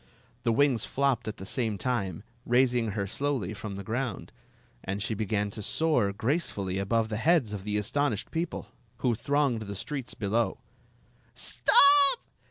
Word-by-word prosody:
The 115 Hz, -1 st, +1 dB
wings 125 Hz, -2 st, +3 dB
flopped 135 Hz, -4 st, 0 dB
at 110 Hz, -, -4 dB
the 95 Hz, -, -8 dB
same 110 Hz, -2 st, -1 dB
time, 100 Hz, -6 st, -2 dB, 0.2 s
raising 120 Hz, -3 st, +2 dB
her 100 Hz, -1 st, -1 dB
slowly 125 Hz, -3 st, -2 dB
from 105 Hz, -1 st, -6 dB
the 100 Hz, -, -6 dB
ground, 120 Hz, +1 st, -3 dB, 0.5 s
and 100 Hz, +1 st, -3 dB
she 110 Hz, +2 st, -1 dB
began 105 Hz, -1 st, -1 dB
to 105 Hz, -, -7 dB
soar 130 Hz, -3 st, +1 dB
grace 140 Hz, -, 0 dB
fully 95 Hz, -1 st, -3 dB
above 110 Hz, +3 st, +1 dB
the 105 Hz, -, -2 dB
heads 140 Hz, -4 st, +2 dB
of 100 Hz, -1 st, -6 dB
the 105 Hz, 0 st, 0 dB
astonished 110 Hz, +1 st, -1 dB
people, 165 Hz, +1 st, -3 dB, 0.4 s
who 120 Hz, -, +4 dB
thronged 140 Hz, 0 st, +1 dB
the 100 Hz, -1 st, -6 dB
streets 130 Hz, +6 st, -5 dB
below. 110 Hz, +3 st, 0 dB, 0.8 s
"Stop! 380 Hz, 0 st, +5 dB
115 Hz, 160 wpm, -28 LUFS, 100-140 Hz, 0.8 s, Stop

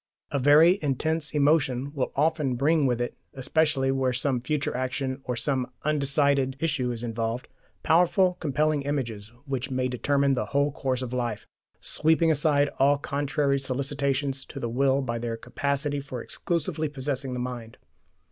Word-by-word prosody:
A 140 Hz, -, 0 dB
very 155 Hz, +8 st, +6 dB
intense 155 Hz, +2 st, 0 dB
emotion 145 Hz, -2 st, +2 dB
will 135 Hz, -4 st, -2 dB
often 150 Hz, -3 st, +1 dB
bring 145 Hz, +3 st, +2 dB
with 120 Hz, -2 st, 0 dB
it 120 Hz, -, -3 dB, 0.2 s
especially 140 Hz, 0 st, +1 dB
where 130 Hz, -1 st, +1 dB
some 130 Hz, 0 st, 0 dB
future 140 Hz, +2 st, -2 dB
action 130 Hz, +1 st, -2 dB
or 125 Hz, -, -2 dB
some 130 Hz, 0 st, -1 dB
undecided 140 Hz, -2 st, +2 dB
issue 145 Hz, -6 st, 0 dB
is 120 Hz, 0 st, -5 dB
involved 115 Hz, +1 st, -3 dB, 0.4 s
powerful 180 Hz, +2 st, +4 dB
compelling 150 Hz, 0 st, +1 dB
images 120 Hz, -7 st, -3 dB
which 135 Hz, -1 st, -3 dB
may 130 Hz, -1 st, 0 dB
determine 140 Hz, +2 st, +1 dB
the 130 Hz, -, -1 dB
whole 145 Hz, +1 st, +3 dB
course 130 Hz, -2 st, -2 dB
of 125 Hz, -1 st, -5 dB
life, 120 Hz, -4 st, -2 dB, 0.4 s
sweeping 160 Hz, +1 st, +3 dB
aside 145 Hz, -1 st, +2 dB
all 140 Hz, +1 st, +4 dB
contrary 140 Hz, 0 st, 0 dB
solicitations 135 Hz, 0 st, -1 dB
to -, -, -8 dB
the 120 Hz, -, -3 dB
will 135 Hz, +3 st, +2 dB
by 120 Hz, -2 st, -3 dB
their 115 Hz, -1 st, -3 dB
capacity 140 Hz, +4 st, -2 dB
for 135 Hz, -3 st, -6 dB
exclusively 160 Hz, -3 st, -2 dB
possessing 135 Hz, -2 st, -3 dB
the 125 Hz, -, -3 dB
mind. 125 Hz, -2 st, -6 dB
140 Hz, 155 wpm, -26 LUFS, 125-145 Hz, 0.4 s, very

